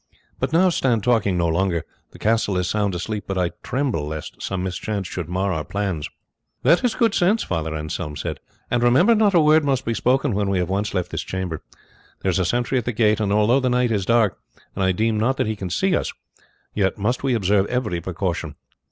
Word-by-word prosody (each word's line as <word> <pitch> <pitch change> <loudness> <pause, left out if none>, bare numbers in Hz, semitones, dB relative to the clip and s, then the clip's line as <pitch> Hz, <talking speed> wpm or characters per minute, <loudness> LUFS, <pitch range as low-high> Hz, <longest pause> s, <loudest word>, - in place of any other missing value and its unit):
But - - -1
now 180 +3 +4
stand 125 - +1
talking 110 -6 +2
no 85 -1 +2
longer; 85 0 0 0.2
the - - -15
castle 110 -3 +1
is 90 0 0
sound 100 -1 0
asleep, 105 +4 -4
but 95 - -2
I 90 -2 +1
tremble 125 - -1
lest 80 0 -7
some 95 -2 -3
mischance 95 +1 -3
should 85 -2 -5
mar 95 +2 0
our 80 -2 -2
plans." 95 -4 -3 0.5
"That 170 - +4
is 245 - +1
good 230 -3 +2
sense," 200 +6 +2
Father 80 -1 -3
Anselm 75 -1 -4
said; - - -4 0.3
"and 120 - +2
remember, 130 - +5
not 210 -3 +3
a - - +7
word 155 0 +5
must 135 -2 0
be 115 - 0
spoken 130 +2 +1
when 100 0 0
we 100 - +1
have 90 -1 -1
once 100 +2 -1
left 90 -1 -1
this - - -2
chamber. 95 -4 -4 0.6
There 95 - +2
is 90 - 0
a 95 - +1
sentry 120 +7 0
at 120 - -6
the 125 - 0
gate; 110 -2 +2
and 105 -2 0
although 105 +5 +4
the 130 -1 0
night 125 -1 +2
is 100 -3 0
dark, 115 -6 +2 0.3
and 95 - -2
I 95 - +3
deem 110 +3 0
not 130 +5 +1
that - - +1
he 110 0 -2
can 95 -3 -5
see 185 - +1
us, - - -1 0.6
yet 95 -2 0
must 110 +5 -1
we 135 -3 +1
observe 100 -1 +2
every 110 -9 -2
precaution." 85 -3 -3
105 Hz, 225 wpm, -22 LUFS, 90-125 Hz, 0.6 s, a